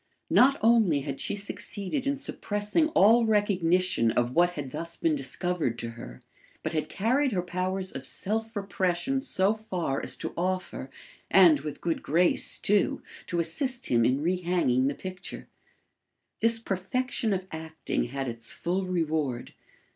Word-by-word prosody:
Not 275 +2 +6
only 220 -10 +4
had 135 -1 -5
she - - -1
succeeded 205 +5 -3
in 280 0 +1
suppressing 210 +3 -1
all 225 +5 +6
recognition 185 - +2
of 120 +2 0
what 175 +3 +4
had 140 -3 -5
thus 170 +3 -5
been 160 -2 +1
discovered 145 -1 -2
to 115 -1 -4
her, 120 +2 -11 0.4
but 155 - -2
had 155 -1 -1
carried 250 +6 +1
her 180 -2 0
powers 185 +1 -2
of 135 - -6
self 225 +2 -3
repression 195 +6 -1
so 200 -7 +1
far 185 -10 -3
as - - -1
to - - -5
offer, 185 -6 -2 0.4
and 175 -6 +7
with 150 +1 -7
good 165 -2 -1
grace 170 +4 +2
too, 205 0 +1 0.2
to 175 - -1
assist 245 - -1
him 120 -1 +4
in 130 +5 +2
rehanging 175 -7 +1
the 140 - -1
picture. 185 0 -7 0.9
This 230 0 +3
perfection 225 +3 -2
of 190 -1 -1
acting 160 0 -3
had 135 +2 -4
its 115 -1 -4
full 185 +2 -2
reward. 155 -8 -1
180 Hz, 150 wpm, -28 LUFS, 150-205 Hz, 0.9 s, and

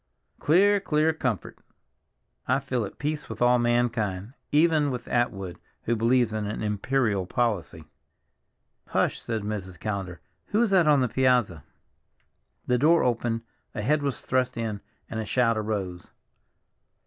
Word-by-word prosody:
"Clear, 200 +6 +4
clear 160 -4 +1
comfort!" 125 - -3 0.9
"I 130 - +3
feel 130 -4 -2
at - - -10
peace 150 +1 -3
with - - -7
all 125 0 +4
mankind—even 120 - +1
with 125 -2 -5
Atwood, 95 -7 -1 0.2
who 120 - 0
believes 115 0 +2
in 105 -1 -2
an 105 +1 -4
imperial 105 -2 0
policy." 90 -10 -1 1.0
"Hush," - - 0
said 110 -2 -3
Mrs. 95 -4 -5
Callender, 95 -5 -4 0.3
"who 215 +3 +2
is 225 - 0
that 180 -5 +4
on 145 -3 +5
the 125 - +2
piazza?" 120 - +1 1.0
The 125 -1 +1
door 165 +4 +4
opened, 115 -1 0 0.3
a 105 - -3
head 150 +6 +2
was 140 -2 -2
thrust 130 -1 0
in, 110 -3 -3 0.3
and 110 - -5
a 110 - -3
shout 115 -1 +2
arose. 100 -5 -3
120 Hz, 140 wpm, -26 LUFS, 105-135 Hz, 1.0 s, on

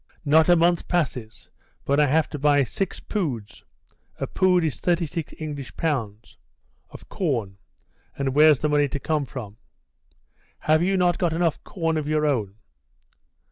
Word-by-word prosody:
"Not 155 +3 +4
a 175 - +7
month 170 0 +2
passes 130 -10 -3 0.3
but 140 +1 +2
I 150 - +4
have 155 +3 +2
to 150 - -5
buy 145 0 +4
six 185 +9 -4
poods 135 - -4 0.6
[a - - -1
pood 180 -2 +2
is 155 -4 -2
36 170 -2 -1
English 145 -4 -7
pounds] 115 -10 -3 0.5
of - - -13
corn, 115 - -2 0.6
and 135 -1 -1
where's 150 0 +6
the 150 - -1
money 145 -1 +3
to 145 +1 -4
come 150 -1 -1
from?" 110 -7 -8 1.0
"Have 155 +1 +3
you 190 +2 +1
not 175 -2 +2
got 170 -3 +1
enough 165 -1 0
corn 165 -3 -2
of 150 -2 -3
your 155 0 +1
own?" 110 -9 -1
150 Hz, 155 wpm, -24 LUFS, 135-165 Hz, 1.0 s, a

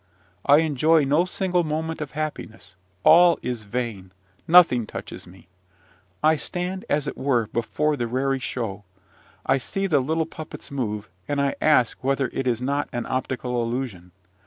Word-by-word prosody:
I 145 +1 +7
enjoy 155 +1 +3
no 150 +6 +2
single 180 -1 0
moment 160 +1 -3
of 150 - -6
happiness: 110 -10 -6 0.3
all 170 +1 +7
is 120 -3 -4
vain 100 -4 -4 0.4
nothing 160 -10 +6
touches - - -8
me. 90 0 -16 0.8
I 155 0 +4
stand, 180 +4 -4
as 145 0 +1
it - - -4
were, 130 -4 +1
before 150 +6 0
the 120 -4 -2
raree 135 +3 0
show: 110 -4 -4 0.6
I 135 - +2
see 195 +9 -3
the 160 -7 +3
little 160 +5 0
puppets 155 -2 -10
move, 105 -6 -3 0.2
and 145 -1 -1
I 140 0 +1
ask 130 -8 +3
whether 135 0 0
it 135 - -2
is 120 0 0
not 140 +2 -1
an 120 - -3
optical 125 -1 -2
illusion. 115 -7 -4
135 Hz, 160 wpm, -24 LUFS, 120-155 Hz, 0.8 s, I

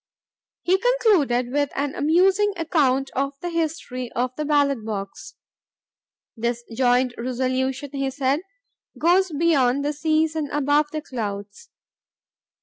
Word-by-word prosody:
He 375 +2 +2
concluded 350 - +2
with 285 +1 +1
an 280 0 -1
amusing 380 +7 +3
account 275 -5 +1
of 275 +1 -1
the 350 +2 -4
history 310 -7 -3
of 250 +1 -1
the 305 - -3
ballot 285 -5 +2
box. 200 -3 -6 1.0
"This 235 +1 -2
joint 250 +1 +2
resolution," 260 +2 -2
he 275 -1 -2
said, 270 +1 0 0.6
"goes 360 +2 +3
beyond 285 -4 +2
the 295 - 0
seas 315 +1 +1
and 305 -3 -2
above 290 +1 +2
the 310 -1 -4
clouds. 205 -7 -6
280 Hz, 125 wpm, -23 LUFS, 255-315 Hz, 1.0 s, amusing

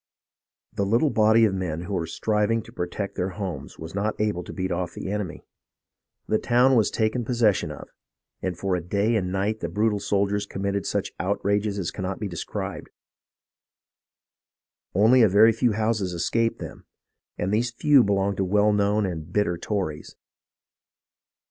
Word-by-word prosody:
The 100 - -1
little 115 +9 +2
body 110 0 +5
of 105 - +1
men 90 -4 -3
who 100 +3 -6
were 85 -3 -1
striving 105 +5 0
to 115 - -14
protect 100 -1 -4
their 90 - -1
homes 90 -9 -5
was 80 0 -8
not 100 +2 -2
able 105 -4 0
to - - -8
beat 95 0 -3
off 90 -1 -3
the 95 - -5
enemy. 105 -6 -4 0.8
The 110 - +2
town 125 +2 +4
was 110 -4 +3
taken 110 +3 0
possession 115 -4 +1
of, - - -9 0.5
and 90 -2 -3
for 95 0 -1
a 90 - -2
day 100 +7 0
and 95 -4 0
a - - -4
night 100 +3 -1
the - - -3
brutal 105 0 +1
soldiers 100 0 0
committed 100 0 -2
such - - -2
outrages 100 0 0
as 90 -4 -2
cannot 95 -1 -4
be 105 - -3
described. 85 -3 -5 2.1
Only 115 +6 +5
a 110 - +6
very 105 +4 +6
few 115 +1 +1
houses 110 -4 0
escaped 115 +7 0
them, - - -9 0.5
and_ 90 - -1
these 115 +4 +1
few 135 +2 +4
belonged 100 -1 0
to 95 - +1
well 105 +3 +3
known 105 +1 +2
and 85 -3 -5
bitter 95 -3 +1
Tories. 85 -4 -4
100 Hz, 165 wpm, -25 LUFS, 95-110 Hz, 2.1 s, a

